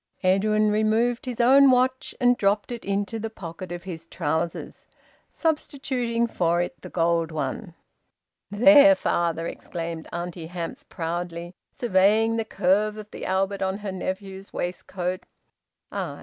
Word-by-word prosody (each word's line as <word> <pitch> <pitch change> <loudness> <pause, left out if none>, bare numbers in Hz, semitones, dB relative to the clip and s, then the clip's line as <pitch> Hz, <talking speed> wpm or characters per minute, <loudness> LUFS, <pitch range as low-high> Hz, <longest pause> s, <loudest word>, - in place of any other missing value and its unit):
Edwin 210 +3 +3
removed 225 +4 +1
his 245 -2 -4
own 270 +3 +7
watch 255 +1 +1
and 245 0 +4
dropped 205 0 +1
it 235 -1 -5
into 200 +3 -2
the 225 +1 -4
pocket 175 -3 -8
of 175 0 -6
his 165 -3 -8
trousers, 165 0 -3 0.4
substituting 265 -7 -1
for 175 -6 +1
it 175 0 -3
the - - -9
gold 165 -1 +1
one. 160 - -4 0.7
"There, 285 +7 +7
father!" 165 - 0
exclaimed 165 -1 -6
Auntie 175 -1 -5
Hamps 170 -1 -6
proudly, 170 +1 -5 0.2
surveying 220 +1 +3
the 225 - -1
curve 210 +2 +1
of 215 0 -9
the - - -6
Albert 195 +1 0
on 190 0 0
her 195 - -2
nephew's 190 +1 -5
waistcoat. 180 +1 -4 0.7
"Ay!" - - -4
195 Hz, 135 wpm, -25 LUFS, 175-225 Hz, 0.7 s, own